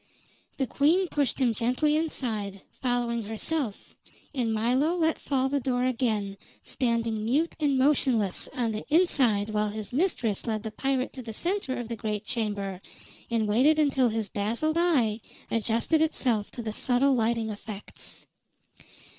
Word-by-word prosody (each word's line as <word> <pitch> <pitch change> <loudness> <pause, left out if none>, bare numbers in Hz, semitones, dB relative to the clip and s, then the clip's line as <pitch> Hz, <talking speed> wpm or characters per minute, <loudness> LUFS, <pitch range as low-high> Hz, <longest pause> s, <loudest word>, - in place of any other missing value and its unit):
The 270 - +1
queen 325 +9 +2
pushed 285 -4 0
him 250 -4 +2
gently 255 +7 +1
inside, 220 -11 -2 0.2
following 245 -2 0
herself, 220 +3 -3 0.4
and 245 -5 0
Milo 250 +9 +2
let 320 -2 +1
fall 265 -2 0
the 280 +1 0
door 250 -1 0
again, 220 -6 0 0.3
standing 230 -4 -1
mute 285 +9 +1
and 285 -3 +2
motionless 255 -8 +2
on 235 -3 0
the 215 0 -4
inside 250 - +3
while 210 0 +1
his 215 +2 -6
mistress 250 - 0
led 215 -2 -1
the 220 - -4
pirate 270 +2 -1
to 260 - -7
the 225 -2 -7
center 340 - -1
of 240 -2 -4
the 230 - -4
great 215 -1 -3
chamber 200 -5 -2 0.5
and 225 -2 +1
waited 260 +9 +4
until 270 -5 +3
his 220 -1 -2
dazzled 235 +10 -1
eye 245 -11 +2 0.3
adjusted 230 +7 +1
itself 245 -9 +1
to 240 - -7
the 215 -1 -3
subtle 260 +4 +3
lighting 230 -2 +1
effects. 210 0 -8
240 Hz, 150 wpm, -27 LUFS, 220-275 Hz, 0.5 s, waited